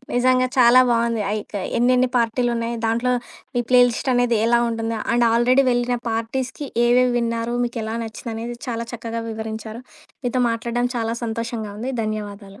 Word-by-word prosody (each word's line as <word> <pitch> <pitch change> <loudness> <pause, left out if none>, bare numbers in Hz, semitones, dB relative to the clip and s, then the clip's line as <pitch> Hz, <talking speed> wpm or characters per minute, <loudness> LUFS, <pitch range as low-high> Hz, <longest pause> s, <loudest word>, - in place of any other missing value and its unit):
నిజంగా 255 +1 +3
చాలా 250 0 +7
బావుంది! 230 -2 +1
అయితే 210 -1 -4 0.2
ఎన్నెన్ని 250 +1 +3
పార్టీలున్నాయి 235 0 0
దాంట్లో 235 +3 +1 0.4
మీ 245 - +2
ప్లే 250 - +5
లిస్ట్ 245 +2 -2
అనేది 245 -2 +2
ఎలా 235 +1 +4
ఉంటుంది? 225 0 -2 0.2
అండ్, 240 0 +3
ఆల్రెడీ 250 +4 +4
వెళ్ళిన 245 0 +1
పార్టీస్‌కి 255 +5 -3 0.2
ఏవేవి 250 +1 +4
విన్నారు, 230 0 -1
మీకెలా 225 -2 -3
నచ్చిందనేది 230 +1 -6
చాలా 230 -1 -3
చక్కగా 230 -1 -5
వివరించారు. 220 +1 -6 0.4
మీతో 250 +1 0
మాట్లాడడం 235 +2 -1
చాలా 230 -1 -1
సంతోషంగా 225 -2 -4
ఉంది. 245 +4 -3
ధన్యవాదాలు. 205 -2 -6
235 Hz, 145 wpm, -22 LUFS, 225-245 Hz, 0.4 s, చాలా